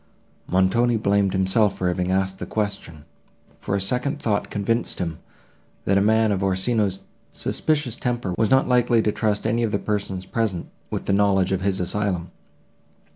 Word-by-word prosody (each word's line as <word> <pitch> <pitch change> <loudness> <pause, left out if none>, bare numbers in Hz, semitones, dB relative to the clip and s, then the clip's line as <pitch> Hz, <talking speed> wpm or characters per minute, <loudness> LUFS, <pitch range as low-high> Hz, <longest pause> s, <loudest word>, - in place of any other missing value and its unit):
Montoni 105 +6 +2
blamed 100 -2 +2
himself 95 +2 +2
for 90 - -1
having 90 0 -1
asked 95 0 0
the - - -5
question, 100 -8 -4 0.5
for 100 - -2
a - - +1
second 125 +9 -1
thought 110 -7 -1
convinced 115 +3 -1
him, 85 -3 -3 0.7
that 100 - +2
a 100 - +4
man 110 +1 +3
of 100 -1 0
Orsino's 95 +1 0 0.3
suspicious 145 -7 -1
temper 120 -6 -2
was 110 +1 +1
not 130 0 +4
likely 120 -2 +3
to 105 - +2
trust 105 -1 -1
any 115 +1 +1
of 115 -2 0
the 100 - +1
persons 100 -3 -3
present 110 -7 -2 0.2
with - - -4
the 100 - +1
knowledge 100 -2 +3
of 95 -1 0
his 95 0 0
asylum. 90 -1 -2
100 Hz, 170 wpm, -23 LUFS, 95-115 Hz, 0.7 s, a